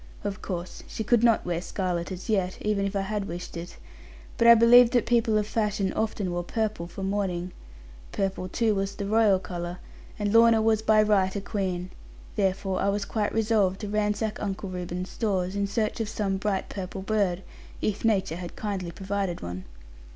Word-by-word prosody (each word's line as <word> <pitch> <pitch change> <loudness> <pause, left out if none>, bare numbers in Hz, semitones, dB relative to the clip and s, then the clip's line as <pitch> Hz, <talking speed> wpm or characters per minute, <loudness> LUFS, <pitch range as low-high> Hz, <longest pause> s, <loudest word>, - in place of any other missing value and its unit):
Of 205 0 -4
course 180 -2 -5
she 220 - -4
could 235 +1 +3
not 230 -2 +4
wear 175 -1 -1
scarlet 180 -2 -2
as 185 0 -7
yet, 190 -4 0
even 210 -2 +1
if 200 - -5
I 195 - +1
had 200 0 -3
wished 175 +1 -6
it; 170 +1 -7 0.6
but 235 - +3
I 235 - +10
believed 235 +2 +7
that 245 - +3
people 230 -2 +3
of 210 - +1
fashion 210 -3 -1
often 210 -4 -1
wore 175 0 -2
purple 210 -3 -2
for 190 +3 -7
mourning; 190 -3 -1 0.6
purple 190 -2 -2
too 225 +2 +1
was 195 0 -2
the 200 - -4
royal 215 -1 +4
colour, 175 -1 -5 0.4
and 205 -1 -1
Lorna 230 0 +6
was 220 -1 +2
by 215 -1 +4
right 200 -3 +2
a - - 0
queen; 185 -3 -3 0.4
therefore 195 -1 0
I 200 - +2
was 200 0 -1
quite 210 -2 -1
resolved 210 -4 +1
to 210 - -4
ransack 210 +1 -1
Uncle 195 -1 -3
Reuben's 180 0 -4
stores, 190 -4 -1
in 200 0 0
search 215 +2 -1
of 220 -2 -2
some 205 -3 -1
bright 195 -1 -1
purple 190 0 -6
bird, 195 -3 0 0.4
if 210 - -2
nature 195 -7 +1
had 175 -1 -7
kindly 195 -4 -3
provided 190 0 -3
one. 90 +1 -6
200 Hz, 190 wpm, -27 LUFS, 185-215 Hz, 0.6 s, I